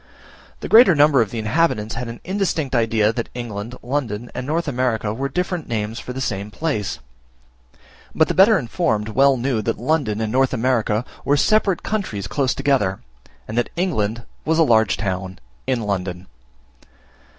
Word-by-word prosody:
The - - -4
greater 220 -6 +7
number 145 -3 +5
of 110 - 0
the 120 - -6
inhabitants 110 -1 0
had 125 0 -4
an 115 0 -8
indistinct 180 -8 -1
idea 115 -2 +2
that 115 0 -4
England, 115 -1 -5
London, 120 -4 -3
and 125 +1 -5
North 165 +2 -1
America, 120 -5 -1
were 135 +4 -3
different 180 +2 -2
names 110 0 -3
for - - -7
the 130 - -5
same 100 -5 -3
place; 110 -5 -2 1.2
but 160 - +4
the - - -1
better 200 +3 +6
informed 115 - -1
well 135 +4 +4
knew 120 -2 0
that 115 +2 -2
London 125 -5 0
and 110 -1 -2
North 130 +1 +2
America 115 -2 0 0.2
were 145 - +2
separate 200 +2 +2
countries 185 - -3
close 130 +5 0
together, 135 -9 +1 0.5
and 110 - -6
that 120 - -1
England 120 - -1 0.2
was 160 0 +1
a 165 - +6
large 110 -8 +3
town 95 -2 -3 0.3
in 125 -3 0
London! 95 -3 -3
120 Hz, 165 wpm, -21 LUFS, 110-145 Hz, 1.2 s, greater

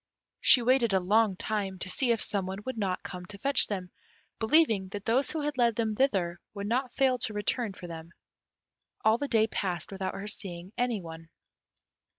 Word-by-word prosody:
She 245 - +6
waited 240 -3 +3
a 190 - +4
long 205 +2 +2
time, 195 -1 -3
to 185 - -5
see 240 +6 +1
if 230 - +1
some 200 -4 -1
one 190 +2 -6
would 260 - -4
not 195 -4 -2
come 180 -1 -7
to 200 - -9
fetch 275 +6 +3
them, 185 -3 -4 0.5
believing 220 -6 +3
that 200 +1 -7
those 255 +5 +2
who 315 - -2
had 290 -3 -3
led 235 -2 +3
them 220 -1 0
thither 190 -9 +1 0.2
would 200 0 -4
not 250 +4 -1
fail 260 -2 +2
to 220 - 0
return 210 +1 -1
for 180 - -11
them. 165 -1 -8 1.0
All 220 +2 +4
the 285 - -2
day 220 -4 +3
passed 185 -5 -3
without 190 -1 -4
her 200 - -6
seeing 185 -2 -1
any 245 -4 -1
one. 165 0 -10
210 Hz, 195 wpm, -29 LUFS, 190-240 Hz, 1.0 s, She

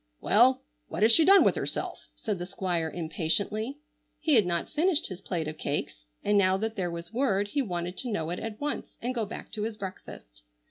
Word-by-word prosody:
"Well, 255 - +4 0.2
what 165 +6 -2
has 225 - +7
she 320 - +7
done 395 +2 +8
with - - +4
herself?" - - -4
said 210 -5 -3
the 175 - -5
Squire 180 -4 -1
impatiently. 200 - -1 0.4
He 315 - +1
had 215 -8 +5
not 170 -1 0
finished 330 +1 +2
his 185 -1 -8
plate 165 -5 -3
of 155 0 -6
cakes, - - -3 0.2
and 205 0 +3
now 190 -1 +3
that 220 +2 -3
there 185 -4 -1
was 170 +3 -7
word 205 -6 +1
he 285 - 0
wanted 180 -5 -3
to 250 - -3
know 165 -5 -2
it 175 - -3
at 220 -1 -6
once 295 0 -4
and 245 +2 -2
go 230 -4 -2
back 220 - -8
to 215 - -5
his 220 0 -3
breakfast. 120 - -9
205 Hz, 215 wpm, -28 LUFS, 175-235 Hz, 0.4 s, done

